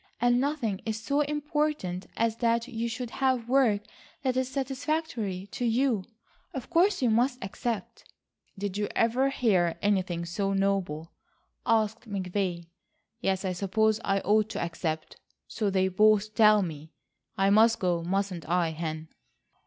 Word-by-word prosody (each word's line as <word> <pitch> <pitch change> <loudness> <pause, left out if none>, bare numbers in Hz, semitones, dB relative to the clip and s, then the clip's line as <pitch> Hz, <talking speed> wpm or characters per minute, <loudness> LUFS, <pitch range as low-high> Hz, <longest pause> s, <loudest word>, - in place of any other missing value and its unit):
And 245 +1 +3
nothing 265 -9 -1
is 220 -1 -3
so 280 +6 0
important 295 - -1
as 225 -1 +1
that 235 0 +1
you 235 -2 -3
should 235 +1 -5
have 260 -3 0
work 245 -6 +3 0.4
that 260 -2 +1
is 260 0 0
satisfactory 265 - -2
to - - -4
you. 235 -4 +1 0.5
Of 265 +4 -6
course 360 -1 +3
you 240 - +3
must 245 +3 +2
accept." 205 +1 -5 0.5
"Did 200 0 -3
you 205 - 0
ever 245 +4 +2
hear 190 -11 +2
anything 185 -4 0
so 195 +3 -1
noble?" 195 -5 -1 0.6
asked 220 +1 +1
McVay. 185 -3 -2 0.5
"Yes, 195 -4 0
I 185 - 0
suppose 215 +4 +1
I 195 0 +1
ought 215 +1 +2
to - - -4
accept. 165 -2 -3 0.3
So 215 -3 -1
they 190 -1 +2
both 215 +2 +3
tell 215 -2 +6
me. 160 -3 -6 0.5
I 195 +1 +3
must 225 +2 +5
go, 175 -2 0
mustn't 185 -1 -2
I, 170 -2 +2
Hen?" 160 0 -4
215 Hz, 145 wpm, -28 LUFS, 185-245 Hz, 0.6 s, tell